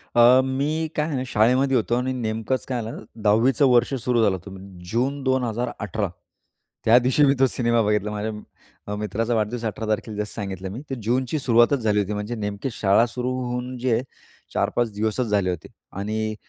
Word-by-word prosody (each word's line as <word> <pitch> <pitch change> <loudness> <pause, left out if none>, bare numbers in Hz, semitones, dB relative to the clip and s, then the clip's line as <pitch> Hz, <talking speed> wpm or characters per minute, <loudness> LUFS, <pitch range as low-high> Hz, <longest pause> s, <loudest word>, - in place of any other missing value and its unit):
अ, 120 +2 +7
मी 145 +5 -1
काय 150 - +1
आहे 150 - -3
ना 130 - -1
शाळेमध्ये 125 +5 +3
होतो 120 +1 0
आणि 125 +1 0
नेमकंच 115 +1 -2
काय 125 -2 -2
झालं 110 +1 -7 0.2
10वी 110 +5 +4
चं 140 - +3
वर्ष 120 +2 +3
सुरू 125 -2 +1
झालं 100 -3 +3
होतं. 95 +2 -9 0.3
जून 135 +5 0
2018 120 -5 -1 0.8
त्या 115 +2 +7
दिवशी 130 +4 +3
मी 135 - +4
तो 135 - +6
सिनेमा 120 -2 +1
बघितला. 105 0 0
माझ्या 105 +1 -3 0.6
अ, 105 - -3
मित्राचा 105 +3 -2
वाढदिवस 115 +2 -1
18 110 +1 -3
तारखेला 110 0 -2
जसं 105 0 -3
सांगितलं 95 -3 -5
मी. 115 +7 -6
ते 135 - -2
जूनची 130 +6 0
सुरुवातच 120 +1 +4
झाली 105 -3 +1
होती. 105 +1 -1
म्हणजे 105 +3 -3
नेमकी 105 +3 -3
शाळा 100 +1 +3
सुरू 125 +1 -3 0.2
होऊन 125 +1 -4
जे 125 +1 -1
आहे 115 - +1 0.5
4-5 120 -2 0
दिवसच 110 +4 -1
झाले 100 -3 +1
होते 90 -3 -4 0.3
आणि 110 +1 -2
115 Hz, 185 wpm, -23 LUFS, 105-125 Hz, 0.8 s, अ